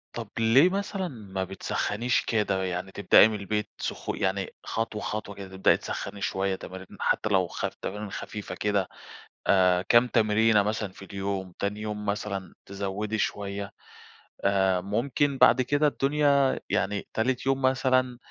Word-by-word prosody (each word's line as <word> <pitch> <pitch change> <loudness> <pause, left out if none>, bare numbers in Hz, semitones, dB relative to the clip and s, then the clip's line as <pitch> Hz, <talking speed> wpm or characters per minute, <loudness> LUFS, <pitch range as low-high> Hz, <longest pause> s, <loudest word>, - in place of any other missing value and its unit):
طَب 115 -3 -5
ليه 120 +9 +6
مثلًا 195 0 -2
ما 100 - -5
بتسخّنيش 105 +5 -1
كده، 100 -4 0
يعني 90 +1 -3
تبدئي 100 +2 +6
من 110 -1 -3
البيت 105 +1 -2
سخ - - -5
يعني 95 0 -2
خطوة، 110 -1 -3
خطوة 105 -1 -4
كده، 100 -1 -8
تبدئي 95 - +4
تسخّني 100 - -6
شويّة 95 0 0
تمارين، 95 0 -9
حتى - - +1
لو 95 -3 +3
خ - - -4 0.2
تمارين 105 +1 -5
خفيفة 105 -4 -6
كده، 100 -1 0 0.6
آآ 90 -2 +4
كام 120 +6 +4
تمرينة 110 -2 +3
مثلًا 105 -1 -2
في 95 - -12
اليوم، 95 -2 -4
تاني 105 +1 -2
يوم 105 -1 -4
مثلًا 100 -3 -3
تزوّدي 100 +2 -3
شويّة 100 -1 -3 0.7
آآ، 95 -2 +2
ممكن 130 +8 0
بعد 130 - +6
كده 145 +4 +2
الدنيا، 140 -1 +2
يعني 100 +1 -1
تالت 125 +3 0
يوم 135 0 +1
مثلًا 130 -1 +2
105 Hz, 150 wpm, -27 LUFS, 95-120 Hz, 0.7 s, ليه